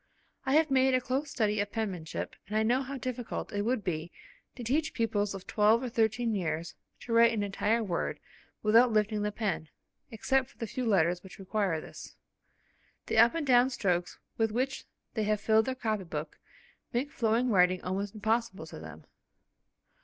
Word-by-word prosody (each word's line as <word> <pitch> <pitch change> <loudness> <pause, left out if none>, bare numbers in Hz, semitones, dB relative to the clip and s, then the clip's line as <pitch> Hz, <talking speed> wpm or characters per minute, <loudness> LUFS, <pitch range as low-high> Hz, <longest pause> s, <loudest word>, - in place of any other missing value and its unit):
I 265 - +2
have 310 -2 +4
made 265 0 +4
a - - +4
close 265 +4 -2
study 215 -6 0
of 205 0 -1
penmanship, 185 -8 -4
and 215 - -1
I 220 - +3
know 245 +4 +2
how 275 +1 -5
difficult 250 -2 -5
it 205 - 0
would 230 0 0
be 165 -1 -3 0.4
to 245 - -7
teach 295 +7 0
pupils 205 -3 0
of 190 - -8
twelve 220 +3 +3
or 250 - -2
thirteen 225 0 +1
years 170 -4 -2 0.3
to 235 - -4
write 230 0 +6
an 210 -2 0
entire 210 +3 0
word 175 -5 -2 0.4
without 230 +3 +5
lifting 215 0 +1
the 210 0 -1
pen, 195 -8 -2 0.4
except 255 +4 0
for - - -23
the 230 - -3
few 250 +2 -3
letters 180 -4 +2
which 190 - -12
require 195 -3 -1
this. - - -11 0.9
The - - +1
up 235 - +6
and 325 -3 -1
down 250 -1 +5
strokes 180 -8 -1 0.2
with 225 -1 +2
which 260 +4 -2 0.3
they 220 -2 -1
have 210 0 +1
filled 220 +1 +3
their 260 - -2
copy 220 -5 -2
book 155 -2 -6 0.5
make 265 +5 -1
flowing 235 0 +1
writing 180 -2 +3
almost 195 +3 -3
impossible 215 -4 -1
to 155 - -10
them. 80 -1 -11
220 Hz, 185 wpm, -30 LUFS, 195-245 Hz, 0.9 s, write